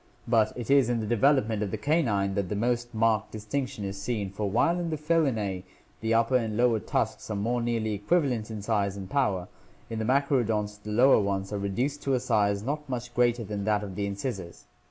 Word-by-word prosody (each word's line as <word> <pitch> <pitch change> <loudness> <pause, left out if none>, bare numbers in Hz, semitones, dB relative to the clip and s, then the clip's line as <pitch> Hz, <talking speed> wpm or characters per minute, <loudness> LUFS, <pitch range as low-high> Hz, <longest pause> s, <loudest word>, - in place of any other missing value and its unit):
But 110 -2 +3
it 120 +1 -3
is 140 -4 +5
in 120 -1 +1
the 110 - -2
development 115 -1 +2
of 105 - -1
the - - -3
canine 115 -11 +1
that 100 -2 -1
the 105 - -2
most 120 +2 0
marked 110 -2 +1
distinction 110 0 -4
is 100 0 -5
seen, 100 -3 -2
for 100 +1 -2
while 165 - +2
in 170 -1 -2
the 155 - -2
Felinae 135 - 0 0.4
the 115 0 +1
upper 115 +3 +3
and 110 -3 -2
lower 120 -2 +3
tusks - - -2
are 105 - -2
more 120 +4 0
nearly 115 -2 -1
equivalent 120 - 0
in 110 -2 -6
size 100 -3 0
and 95 -1 -6
power, 100 -11 +1 0.4
in 115 - -3
the 110 - -1
machaerodonts 115 -6 +1
the 105 - -8
lower 125 +5 +6
ones 100 0 -2
are 100 - -1
reduced 125 +9 -2
to 135 -1 +1
a - - +1
size 100 -3 +1
not 150 +3 -3
much 120 -1 -4
greater 120 -1 +2
than 105 -1 -4
that 105 -1 +1
of 100 -2 -6
the 100 +2 -2
incisors. 100 -4 -5
110 Hz, 215 wpm, -28 LUFS, 100-125 Hz, 0.4 s, lower